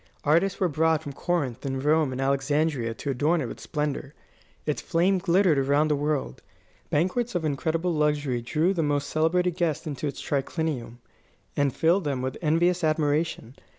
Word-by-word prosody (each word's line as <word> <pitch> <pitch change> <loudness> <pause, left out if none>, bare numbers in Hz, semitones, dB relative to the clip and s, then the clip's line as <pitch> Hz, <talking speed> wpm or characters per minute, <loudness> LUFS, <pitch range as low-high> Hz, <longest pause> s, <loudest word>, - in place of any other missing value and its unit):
Artists 170 +6 +2
were 185 - +3
brought 160 0 +1
from 145 -2 -6
Corinth 140 -6 -2
and 135 -1 -3
Rome 150 -1 +3
and 130 - -5
Alexandria 135 -2 0
to 140 - -3
adorn 150 +6 +1
it 145 - -2
with - - -7
splendour. 150 -1 -3 0.5
Its 150 - -1
fame 180 +3 +2
glittered 175 -3 +3
around 140 +3 +2
the 150 - +3
world. 145 - -2 0.5
Banquets 190 +9 0
of 170 -2 0
incredible 160 +4 0
luxury 150 -5 0
drew 155 +9 +1
the 170 - 0
most 145 -2 -1
celebrated 175 +3 +1
guests 170 -3 0
into 150 -1 -3
its 140 - -5
triclinium, 140 -4 -2 0.6
and 145 -1 +2
filled 175 +4 +3
them 135 -3 -1
with 130 0 -3
envious 175 +3 +2
admiration. 155 -4 0
150 Hz, 165 wpm, -26 LUFS, 140-165 Hz, 0.6 s, were